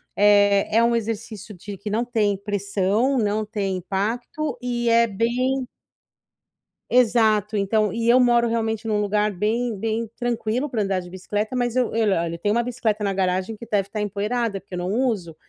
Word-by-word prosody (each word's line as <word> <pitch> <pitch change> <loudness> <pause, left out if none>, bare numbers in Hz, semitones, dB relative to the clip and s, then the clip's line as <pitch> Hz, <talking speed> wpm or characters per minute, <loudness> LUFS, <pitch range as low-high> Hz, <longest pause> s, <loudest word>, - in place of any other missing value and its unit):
eh, 205 0 +4
é 230 - +5
um 235 0 +3
exercício 220 -1 -4
de 195 +2 -9
que 200 +3 -6
não 225 +3 +1
tem 220 -4 +1
pressão, 205 +5 0
não 215 0 0
tem 200 -3 -2
impacto 230 - -3
e 240 -1 -1
é 230 0 +5
bem 245 +5 -1 1.2
Exato, 220 -4 +3
então, 210 +1 +1
e 230 +3 -2
eu 245 +2 +6
moro 240 -1 +4
realmente 225 -1 -1
num 210 -1 +1
lugar 210 +1 +1
bem, 220 +5 -1
bem 225 +3 -2
tranquilo 240 +3 -1
pra 225 -4 -1
andar 195 -1 0
de 180 -1 -9
bicicleta, 205 +5 -3
mas 245 -1 -1
eu 255 -1 +3
eu, 220 -2 +2
olha, 170 0 -2
tenho 205 +4 0
uma 235 - +2
bicicleta 230 -3 -2
na 200 - +1
garagem 185 +2 -1
que 235 - -9
deve 205 -3 0
estar 210 +1 -4
empoeirada 210 +1 -2
porque 190 0 -9
eu - - -4
não 180 +1 -2
uso. 215 -10 -1
215 Hz, 180 wpm, -23 LUFS, 200-235 Hz, 1.2 s, eu